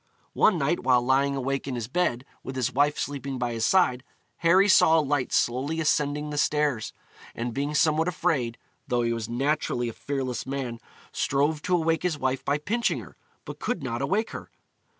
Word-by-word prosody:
One 210 - +4
night, 155 +3 0
while 125 -1 +4
lying 135 +2 +2
awake 135 +1 -2
in 130 - -3
his 115 -2 -4
bed, 130 -4 0 0.2
with 130 - -7
his 130 -3 -1
wife 145 +2 +2
sleeping 140 -1 -4
by 120 -1 -2
his 115 -1 0
side, 130 -10 +3 0.3
Harry 185 +4 +4
saw 165 -4 +6
a - - +5
light 145 -3 0
slowly 135 +7 0
ascending 150 -1 0
the 145 - -2
stairs, 145 -8 0 0.4
and 120 0 -3
being 145 +3 -2
somewhat 160 +1 +3
afraid, 145 -9 -1 0.3
though 120 -3 +1
he 115 0 0
was 115 -1 -4
naturally 120 -1 0
a - - -7
fearless 130 -3 -4
man, 130 -4 -4 0.3
strove 145 +3 0
to 180 - +1
awake 165 -1 +1
his 180 -4 -1
wife 130 -1 -1
by 145 - +1
pinching 225 +10 0
her, - - -12 0.3
but - - -8
could 240 - -2
not 120 -2 -3
awake 195 +11 0
her. - - -8
140 Hz, 190 wpm, -26 LUFS, 125-155 Hz, 0.4 s, saw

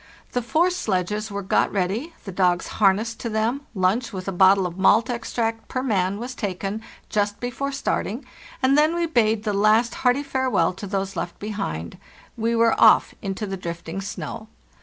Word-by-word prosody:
The 245 - 0
four 320 +10 +2
sledges 210 - -1
were 200 0 -4
got 190 - +2
ready, 210 - -2
the 195 - -5
dogs 180 -1 +2 0.2
harnessed 215 +3 +3
to 235 - -3
them, 230 +7 -1
lunch, 195 +6 +1
with 185 -2 -6
a - - 0
bottle 190 +1 +5
of 175 -1 -4
malt 225 +5 +4
extract 230 -1 -2
per 255 - -3
man, 195 -5 0
was 245 +4 -5
taken 200 -1 -3 0.3
just 205 -1 -1
before 245 +3 -3
start 275 0 -1
ing, 240 +7 -6 0.4
and 265 +1 +4
then 305 +3 +4
we 345 0 +1
bade 225 -8 +2
the 210 -2 -1
last 215 +4 +3
hearty 250 +3 +3
farewell 260 -11 +1
to 200 +2 -7
those 195 0 -2
left 175 - -4
behind. 140 - -5 0.4
We 230 +1 0
were 230 0 +4
off 220 - +6
into 195 +2 -3
the 195 -1 -4
drifting 170 +1 -5
snow. 215 +2 -6
215 Hz, 180 wpm, -23 LUFS, 195-245 Hz, 0.4 s, off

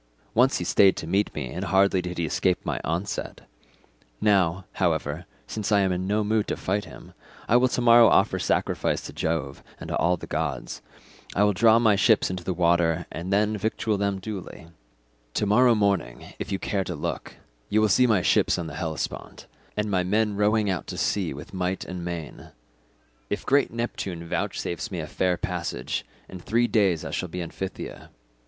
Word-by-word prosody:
Once 125 +4 +4
he - - -3
stayed 95 +2 +4
to - - -5
meet 95 +5 +1
me 65 - -4
and 90 +3 -4
hardly 95 -1 +3
did 90 0 -6
he 85 - 0
escape 90 +4 +1
my - - -2
onset: 85 +5 -3 0.8
now, 95 -3 +2 0.2
however, 80 -1 0 0.2
since 110 -1 -4
I 100 -1 +5
am 95 -1 +2
in 90 +1 -2
no 105 +2 +1
mood 110 0 +1
to - - -2
fight 100 +2 -1
him, - - -13 0.3
I 115 - +3
will 125 +1 +4
to 125 - -1
morrow 120 -1 +7
offer - - +3
sacrifice - - 0
to - - -9
Jove 75 -4 -2 0.2
and - - -8
to - - -1
all 90 +1 +2
the - - -8
gods; 75 -6 -3 0.5
I 100 - +3
will 105 0 +3
draw 110 +3 +5
my 110 -3 +4
ships 100 -1 +3
into 90 -1 -5
the 95 - -2
water 85 -1 +2
and 85 +4 -5
then 105 +2 +2
victual 110 0 -1
them 100 -1 0
duly; 95 -4 -8 0.7
to - - +1
morrow 120 +4 +5
morning, 100 - -1
if - - -5
you 95 - 0
care 95 0 -1
to 90 - -4
look, 75 - -5 0.3
you 110 - +3
will 110 - +4
see 125 +6 +4
my 105 -6 +2
ships - - +3
on 85 - -3
the 80 -3 -7
Hellespont, 80 -3 -5 0.3
and 105 0 -1
my 95 -2 +2
men 105 +2 +1
rowing 105 +1 +2
out 95 -4 -2
to - - -6
sea 95 -5 0
with 70 +6 -9
might 90 0 -2
and 90 -1 -6
main. 85 -3 -6 0.8
If - - -3
great 140 +1 +3
Neptune 95 -7 -4
vouchsafes 85 +1 -3
me 90 - -4
a 80 - -3
fair 90 +3 0
passage, 60 - -3 0.2
in 95 - -9
three 115 +8 +1
days 100 -9 +2
I - - -5
shall 90 - -3
be 90 +2 -5
in 85 - -6
Phthia. 95 -1 -7
95 Hz, 195 wpm, -25 LUFS, 85-105 Hz, 0.8 s, morrow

